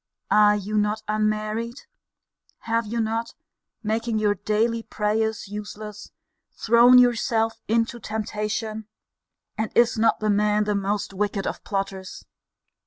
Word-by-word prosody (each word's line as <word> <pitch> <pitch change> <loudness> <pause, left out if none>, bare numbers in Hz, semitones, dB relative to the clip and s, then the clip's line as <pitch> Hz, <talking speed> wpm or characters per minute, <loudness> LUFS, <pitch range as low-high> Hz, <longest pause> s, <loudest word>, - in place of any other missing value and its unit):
Are 210 0 +6
you 210 +1 -1
not 210 +1 -1
unmarried? 215 +3 -1 0.8
Have 230 -1 -1
you 230 +2 -2
not 225 +1 -2 0.5
(making 225 +1 -1
your 210 -1 +2
daily 220 +4 0
prayers 220 0 -1
useless) 210 0 -8 0.4
thrown 235 +2 +6
yourself 230 -2 +2
into 230 +2 0
temptation? 215 0 -4 0.7
And 220 -1 -1
is 235 -1 +4
not 225 - +3
the 215 -1 +1
man 210 +1 +2
the 210 0 0
most 200 0 -2
wicked 200 0 -2
of - - -4
plotters? 195 -1 -4
215 Hz, 120 wpm, -24 LUFS, 210-225 Hz, 0.8 s, Are